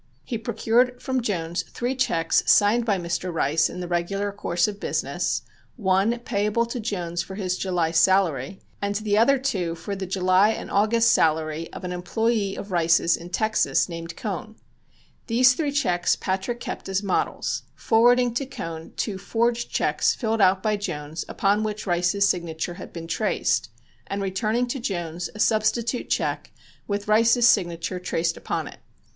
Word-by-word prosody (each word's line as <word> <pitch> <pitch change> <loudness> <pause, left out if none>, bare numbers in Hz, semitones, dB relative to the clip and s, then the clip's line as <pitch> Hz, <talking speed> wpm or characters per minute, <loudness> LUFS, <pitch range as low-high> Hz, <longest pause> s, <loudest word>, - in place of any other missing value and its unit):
He 230 - -4
procured 245 +2 +1
from 260 0 -1
Jones 175 -6 -2
three 245 +2 -3
checks 165 -11 +2
signed 220 +3 +4
by 205 -4 +2
Mr. 175 +1 -3
Rice 160 -1 +1
in 180 - -7
the 180 - -4
regular 195 +4 -1
course 175 -3 0
of 205 -1 -6
business, - - -1 0.3
one 195 +1 +2
payable 210 0 0
to 235 +1 -5
Jones 175 -6 -2
for 190 - -8
his 185 -3 -1
July 180 -4 0
salary 165 -2 +2 0.2
and 200 0 -1
the 210 0 0
other 250 +6 +5
two 190 -11 -2
for 200 +5 -5
the 190 -1 -5
July 185 +2 +3
and - - -7
August 225 +3 +3
salary 160 0 +1
of - - -9
an 180 - -4
employee 200 +3 -1
of 200 - -7
Rice's 170 -1 +3
in 170 +1 -9
Texas 215 +4 +1
named 165 -1 -7
Cohn. 215 +1 -5 0.7
These 250 +2 +5
three 290 +1 -1
checks 180 -12 +1
Patrick 190 +6 -2
kept - - -6
as 195 +1 0
models, 195 -3 -1
forwarding 245 +1 +3
to 270 +3 -1
Cohn 165 -11 -7
two 200 -4 -2
forged 235 +3 0
checks - - +1
filled 225 -3 -1
out 190 0 +4
by 215 -1 +1
Jones 150 -5 -5
upon 200 +2 +1
which 215 -1 -3
Rice's 180 +2 +2
signature 170 -1 -2
had 185 - -10
been 165 -1 -7
traced, - - 0 0.4
and 200 - -3
returning 215 +5 0
to 270 - -3
Jones 175 -6 -3
a - - -9
substitute 225 +3 +1
check - - -1 0.4
with 205 0 -3
Rice's 230 +3 +5
signature 175 -3 +1
traced 165 -2 -1
upon - - -3
it. - - -12
200 Hz, 165 wpm, -24 LUFS, 175-225 Hz, 0.7 s, other